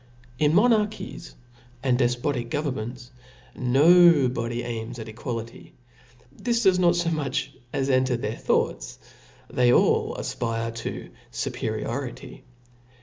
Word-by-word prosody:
In 150 +1 +3
monarchies 210 -5 +1 0.5
and 130 -2 +2
defpotic 120 0 0
govemments, 130 -3 -4 0.4
no 150 +3 +5
body 120 -1 -3
aims 115 0 -5
at 110 - -7
equality; 115 +1 -7 0.6
this 235 - -1
does 190 -2 +4
not 175 -1 +4
fo 175 -1 0
much 140 -3 -2 0.2
as 135 -1 -1
enter 130 -1 +2
their 110 -1 -3
thoughts; - - -1 0.5
they 125 -1 +2
all - - +3
afpre 115 -1 -3
to 115 - -6 0.2
fuperiority. - - -4
130 Hz, 110 wpm, -25 LUFS, 120-160 Hz, 0.6 s, no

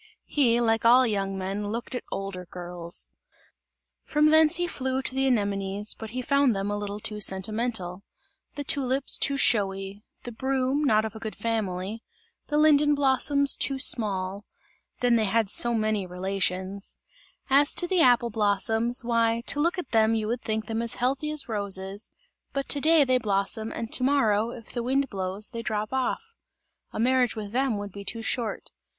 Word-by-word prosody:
He, 240 -5 +2
like 225 -1 +1
all 245 +3 +6
young 195 -3 -2
men 195 +2 -3
looked 230 +5 -5
at 250 - -3
older 195 -2 -5
girls. 175 -1 -2 0.9
From 300 0 +2
thence 315 +1 +5
he 350 +1 0
flew 265 -5 -2
to 260 - +2
the 270 0 +1
anemones; 200 -3 0
but 220 - -9
he 250 +3 -4
found 280 -3 +2
them 195 +1 -2
a - - -1
little 205 0 -5
too 210 0 -4
sentimental; 195 -1 -1 0.5
the 285 - -4
tulips, 270 -1 +1
too 280 - +1
showy; 195 -4 0 0.2
the 240 - -6
broom, 265 +4 -1
not 215 -4 +3
of 220 0 -6
a - - -7
good 220 -1 -6
family; 215 -2 -3 0.5
the 295 - 0
linden 295 -1 +4
blossoms, 280 +1 +2
too 275 - -1
small 200 -7 +2 0.6
then 245 -1 +3
they 220 - +1
had 215 0 +1
so 240 0 +4
many 215 -3 -1
relations; 190 +1 -2 0.5
as 285 +1 +4
to 355 - +3
the 360 -1 +2
apple 240 -3 +4
blossoms, 220 +3 +1
why 230 -1 +1
to 290 - +1
look 340 +5 +1
at 355 -7 -6
them 225 -1 +3
you 215 -1 -2
would 235 +2 -2
think 220 0 -3
them 225 +1 -3
as 235 0 -1
healthy 265 +5 -1
as 305 -2 +1
roses, 200 -2 -3 0.4
but 275 -1 -3
to 285 - -1
day 320 0 +5
they 255 -1 +2
blossom 210 +1 -1
and 230 -1 -6
to - - +1
morrow, 230 -6 +2
if 235 -2 -10
the 240 - -3
wind 270 +3 0
blows, 190 +3 -4
they 230 -2 -5
drop 215 0 -3
off; 455 - -2 0.6
a - - -6
marriage 250 0 +2
with 210 -2 -6
them 255 -2 0
would 205 0 -6
be 200 +2 -9
too 225 +3 -4
short. 230 -1 -3
230 Hz, 180 wpm, -26 LUFS, 205-265 Hz, 0.9 s, all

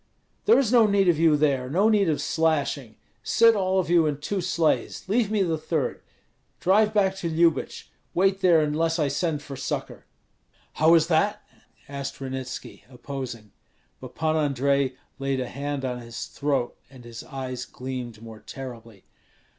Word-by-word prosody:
"There 440 - +6
is 255 -5 +2
no 235 -3 +6
need 200 -2 +2
of 160 -3 +2
you 160 -2 +4
there, 135 -4 +1
no 190 +9 +3
need 205 -5 +3
of 150 - 0
slashing! 145 -7 0 0.3
Sit 230 -1 +4
all 190 -1 +1
of 185 - -1
you 170 -2 +4
in 145 -2 -1
two 190 +7 -3
sleighs, 170 -1 0
leave 215 +1 +1
me 210 -2 +2
the 165 -3 -1
third. 155 -3 -2 0.6
Drive 210 +3 +3
back 195 -3 +2
to 170 - -3
Lyubich; 165 -2 0 0.2
wait 195 +2 +2
there 175 -4 +5
unless 160 +2 0
I 150 -4 +1
send 150 +1 -1
for 140 - -8
succor." 130 -1 -5 0.7
"How 160 +2 +5
is 160 -2 +4
that?" 170 +5 +1 0.4
asked 140 -1 -6
Ranitski, 130 -1 -6
opposing. 125 -5 -7 0.5
But 130 -1 -11
Pan 160 0 0
Andrei 140 -2 +1 0.3
laid 135 -1 -1
a 125 - -3
hand 140 0 -4
on 125 -1 -3
his 115 -1 -7
throat, 140 -4 -2
and 130 -2 -14
his 115 -1 -9
eyes 130 -2 -5
gleamed 125 -4 -7
more 110 -1 -10
terribly. 115 -6 -10
150 Hz, 165 wpm, -25 LUFS, 130-175 Hz, 0.7 s, There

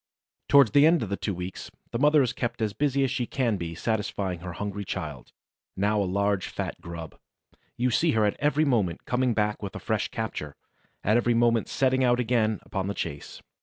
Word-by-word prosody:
Towards 140 -6 +6
the 145 +5 +6
end 165 -5 +3
of 105 - -5
the 100 - 0
two 100 -1 -3
weeks, 90 +1 -6 0.2
the 115 - -2
mother 150 +1 +5
is 125 - -1
kept 120 -1 -3
as 110 -2 -1
busy 140 +2 +1
as 130 - 0
she 125 -3 -1
can 120 -6 0
be 85 -2 -5
satisfying 100 -3 -2
her 90 0 -7
hungry 100 +2 -4
child, 75 -8 -6 0.4
now 105 +2 +1
a - - 0
large, 100 0 0
fat - - -5
grub. 85 -2 -8 0.6
You 125 +1 +1
see 160 +7 +2
her 110 -1 +3
at 105 - +1
every 150 +1 +2
moment 105 - 0
coming 125 -1 +1
back 105 -1 0
with 100 -2 -6
a - - -4
fresh - - -1
capture, 75 -1 -5 0.5
at 105 +3 +3
every 120 0 +2
moment 115 -1 +3
setting 130 0 +2
out 120 -1 +3
again 110 -3 +1
upon 95 -2 -3
the 100 - -3
chase. 70 -4 -6
110 Hz, 205 wpm, -27 LUFS, 100-125 Hz, 0.6 s, Towards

